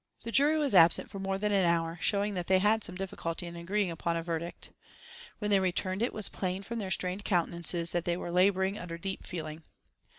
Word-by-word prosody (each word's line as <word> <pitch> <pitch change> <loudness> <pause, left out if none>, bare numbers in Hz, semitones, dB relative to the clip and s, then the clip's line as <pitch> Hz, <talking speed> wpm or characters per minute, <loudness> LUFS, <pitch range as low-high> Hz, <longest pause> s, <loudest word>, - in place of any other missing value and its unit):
The 230 - -5
jury 290 +5 +4
was 290 -5 0
absent 170 -2 +6
for 195 - -6
more 195 0 -1
than 210 +1 -1
an 195 -2 +3
hour, 170 -1 +1
showing 205 0 +1
that 180 -2 -4
they 190 - +5
had 210 +3 +3
some 180 - -1
difficulty 180 -3 -4
in 170 0 -8
agreeing 185 +2 -1
upon 170 +1 -2
a 165 - -3
verdict. 170 0 -5 0.7
When 210 -1 -2
they 200 - +5
returned 185 +1 -1
it 240 - +1
was 215 -2 -1
plain 185 +1 -3
from 230 +3 -5
their 195 -3 -4
strained 185 +1 -1
countenances 170 -2 0
that 175 -1 -1
they 175 0 0
were 175 - -5
labouring 190 +2 +2
under 170 -1 -6
deep 190 +3 -5
feeling. 155 -3 -6
185 Hz, 220 wpm, -30 LUFS, 170-200 Hz, 0.7 s, absent